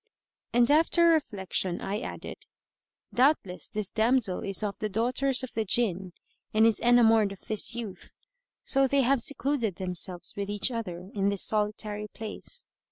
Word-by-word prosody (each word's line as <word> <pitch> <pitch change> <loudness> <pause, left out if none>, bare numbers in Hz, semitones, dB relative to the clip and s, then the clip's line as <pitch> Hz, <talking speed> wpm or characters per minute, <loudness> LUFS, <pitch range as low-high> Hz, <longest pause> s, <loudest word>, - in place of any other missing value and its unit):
And 240 +2 +3
after 330 +2 +5
reflection 195 - 0
I 200 +2 -3
added, - - -8 0.7
"Doubtless 245 -8 +1
this 210 -2 -2
damsel 225 -4 +1
is 195 +2 -1
of 205 -1 -3
the 215 - -2
daughters 250 +5 +1
of 260 - -6
the 220 - -1
Jinn 190 -4 +1 0.4
and 220 +1 +5
is 225 -2 +3
enamoured 225 -3 +4
of 200 - -10
this 215 +2 0
youth; 225 -5 -8 0.5
so 270 0 +2
they 280 +1 +2
have 260 0 +2
secluded 265 -6 -1
themselves 180 -1 -2
with 200 0 -4
each 205 +4 0
other 185 -5 -6
in 200 -1 +1
this 200 -2 +1
solitary 210 0 -1
place." 220 - -7
220 Hz, 155 wpm, -28 LUFS, 200-245 Hz, 0.7 s, after